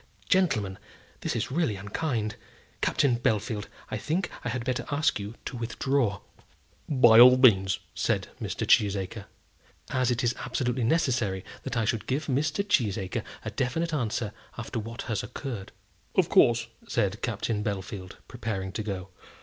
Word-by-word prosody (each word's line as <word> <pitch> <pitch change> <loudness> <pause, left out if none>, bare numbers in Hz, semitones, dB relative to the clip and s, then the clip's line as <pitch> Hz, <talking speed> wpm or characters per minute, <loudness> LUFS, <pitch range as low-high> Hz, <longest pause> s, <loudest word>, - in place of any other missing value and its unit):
gentlemen! 110 - +2 0.4
this - - -2
is - - -2
really 150 -7 +1
unkind. 105 +2 -2 0.5
Captain 125 -4 +2
Bellfield, 110 -3 0 0.2
I - - -1
think 175 +5 -1
I 125 - -2
had 120 -1 -3
better 130 -1 -1
ask 145 -5 +1
you 105 +3 -6
to - - -5
withdraw." 115 -2 0 0.7
"By 120 -5 +7
all 125 +1 +10
means," 100 -7 +5 0.2
said - - 0
Mr. - - -2
Cheesacre. 100 0 +2 0.7
"As 130 -2 +2
it 120 -1 0
is 120 0 +2
absolutely 125 -1 -1
necessary 120 - +1 0.2
that - - -4
I 115 - +2
should 110 0 -1
give 140 +4 -1
Mr. 150 +8 0
Cheesacre 105 - +1 0.2
a - - -3
definite 160 +6 -1
answer 115 -5 -1 0.2
after 120 +1 -4
what 115 +2 -6
has 110 -4 -2
occurred 120 -9 -6 0.2
" - - -36
"Of - - +3
course," 120 0 +5 0.2
said 105 -1 0
Captain 110 -2 -1
Bellfield, 95 -2 -4
preparing 110 -6 -4
to 105 +3 -3
go. 100 -3 -4
115 Hz, 150 wpm, -28 LUFS, 105-130 Hz, 0.7 s, all